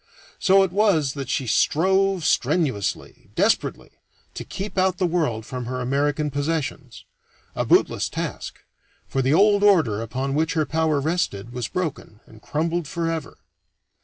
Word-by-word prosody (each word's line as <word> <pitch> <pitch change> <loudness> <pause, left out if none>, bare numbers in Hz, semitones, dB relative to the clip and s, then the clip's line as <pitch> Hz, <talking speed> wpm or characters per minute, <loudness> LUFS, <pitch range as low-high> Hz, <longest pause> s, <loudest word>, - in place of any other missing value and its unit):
So 195 0 +5
it 190 - -1
was 180 -9 +2
that 140 -3 -6
she 135 - -1
strove 190 - +2
strenuously, 130 - -1
desperately, - - 0 0.4
to - - -6
keep 200 +2 -6
out 185 -1 +2
the 185 - +1
world 155 -11 -1
from 125 0 -5
her 130 +1 -4
American 145 +3 0
possessions 140 -3 -3 0.5
a - - -1
bootless - - +2
task, - - -5 0.5
for 135 - -1
the 135 +4 +2
old 205 +2 +4
order 155 - +4
upon 130 +4 -3
which 155 +3 0
her 155 -2 +2
power 155 -1 +1
rested 135 - -2
was 125 -1 -3
broken 155 -11 -4
and 110 -1 -17
crumbled 165 +1 -2
forever. 165 0 -3
155 Hz, 145 wpm, -23 LUFS, 130-180 Hz, 0.5 s, So